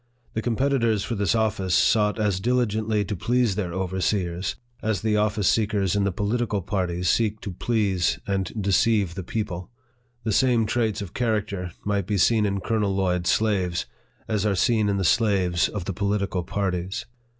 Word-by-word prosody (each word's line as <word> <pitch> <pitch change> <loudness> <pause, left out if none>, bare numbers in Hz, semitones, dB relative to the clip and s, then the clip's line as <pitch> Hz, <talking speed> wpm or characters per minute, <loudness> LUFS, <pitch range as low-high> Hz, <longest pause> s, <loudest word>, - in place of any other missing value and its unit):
The 110 - -1
competitors 115 -3 +1
for - - -3
this 100 0 +1
office 100 -5 +1
sought 105 -1 +3
as 105 -4 0
diligently 110 -2 +1
to 105 - -3
please 120 +3 +1
their 95 -3 -3
overseers, 95 0 -1 0.3
as 110 -3 -1
the 110 -1 +2
office 105 -2 +1
seekers 105 -3 +1
in 100 -1 +2
the 100 - +1
political 105 +1 -1
parties 90 -2 -1
seek 110 +2 +1
to 100 - -5
please 100 -2 0
and 95 -1 -1
deceive 100 -1 +2
the 95 - -5
people. 90 -2 -4 0.5
The 110 - -1
same 120 0 +3
traits 110 -2 0
of 90 - -9
character 105 -6 -1
might 100 -3 0
be 105 - 0
seen 105 +3 +3
in 100 -1 -2
Colonel 105 -2 0
Lloyd's 90 -2 0
slaves, 95 -6 +1 0.4
as 105 -3 0
are 105 -2 +1
seen 110 +2 +2
in 100 - +1
the 95 - 0
slaves 95 -3 +2
of 100 -4 -5
the 95 - -3
political 100 -1 -1
parties. 95 0 -2
100 Hz, 170 wpm, -24 LUFS, 95-110 Hz, 0.5 s, sought